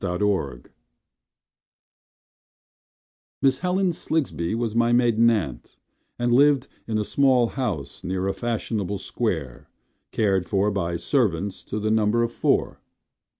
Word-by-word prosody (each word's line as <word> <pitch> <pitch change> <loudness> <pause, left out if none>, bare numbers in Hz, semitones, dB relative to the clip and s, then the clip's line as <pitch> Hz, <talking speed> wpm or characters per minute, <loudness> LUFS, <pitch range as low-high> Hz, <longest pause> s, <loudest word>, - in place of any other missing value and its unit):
Aunt 90 -1 -2
Helen 75 -12 -1 2.8
Miss 135 -1 +3
Helen 180 0 +1
Slingsby 135 - -2
was 115 -2 -2
my 115 +1 +2
maiden 120 -1 +4
aunt, 85 - -3 0.4
And 120 0 +1
lived 140 0 +4 0.2
in 110 -1 -1
a 105 - 0
small 130 -1 +3
house 120 - -4
near 95 +1 -2
a 95 - 0
fashionable 110 -4 -2
square 80 - -3 0.4
Cared 95 -4 +1
for 100 +1 +2
by 85 -3 -2
servants 100 - -1
to 105 - -4
the 110 +1 -1
number 110 +1 +2
of 115 - -1
four. - - 0
110 Hz, 125 wpm, -24 LUFS, 95-120 Hz, 2.8 s, maiden